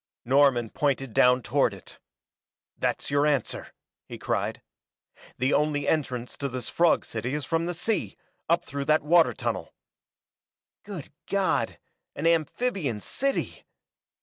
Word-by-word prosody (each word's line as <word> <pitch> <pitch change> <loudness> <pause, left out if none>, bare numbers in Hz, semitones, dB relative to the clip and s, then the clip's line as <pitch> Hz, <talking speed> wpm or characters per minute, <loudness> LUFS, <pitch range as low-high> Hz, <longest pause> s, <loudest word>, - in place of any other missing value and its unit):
Norman 130 -3 +3
pointed 135 -4 -1
down 125 +1 +5
toward 120 -2 +1
it. 95 - -13 0.8
"That's - - -2
your 145 +1 +3
answer!" 140 -6 -1 0.4
he - - -7
cried. - - -2 0.7
"The 130 +3 +1
only 150 -1 +1
entrance 125 -6 -1
to 140 - -2
this 130 -1 -4
frog 170 -1 +3
city 120 +5 -3
is 150 -2 -3
from 165 +2 0
the 175 - -3
sea, 215 +6 -1 0.3
up 170 +1 +2
through 140 0 -4
that 155 +1 +3
water 165 +2 +4
tunnel!" - - -3 1.1
"Good 190 -9 -8
God, 195 -1 0 0.4
an - - -4
amphibian 165 - +1
city!" 275 - -2
145 Hz, 130 wpm, -27 LUFS, 130-165 Hz, 1.1 s, down